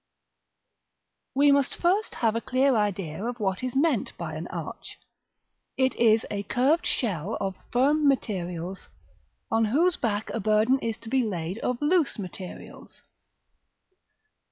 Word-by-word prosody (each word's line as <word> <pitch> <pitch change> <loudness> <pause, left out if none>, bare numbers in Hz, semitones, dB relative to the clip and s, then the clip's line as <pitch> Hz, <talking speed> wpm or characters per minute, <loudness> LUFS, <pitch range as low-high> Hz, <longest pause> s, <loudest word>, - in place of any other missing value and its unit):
We 285 +1 +5
must 280 -1 +2
first 380 +5 +1
have 225 -2 +1
a 230 - -1
clear 260 +1 +2
idea 195 -5 -1
of 240 +1 -3
what 190 -3 -1
is 255 0 -4
meant 310 +4 +1
by - - -5
an - - -5
arch. - - -7 0.8
It 260 0 +2
is 225 -1 +4
a 205 -1 -2
curved 260 - +1
shell 200 - -1
of 195 -1 -2 0.2
firm 290 +4 +3
materials, 185 -8 -2 0.6
on 225 0 +3
whose 325 +11 +2
back 215 -3 -2
a 230 - -2
burden 215 +5 +3
is 225 -2 -3
to 225 - -8
be 260 +2 +2
laid 185 -2 -3
of 250 0 -2
loose 325 -2 +2
materials. 185 -2 -9
230 Hz, 140 wpm, -26 LUFS, 200-270 Hz, 0.8 s, We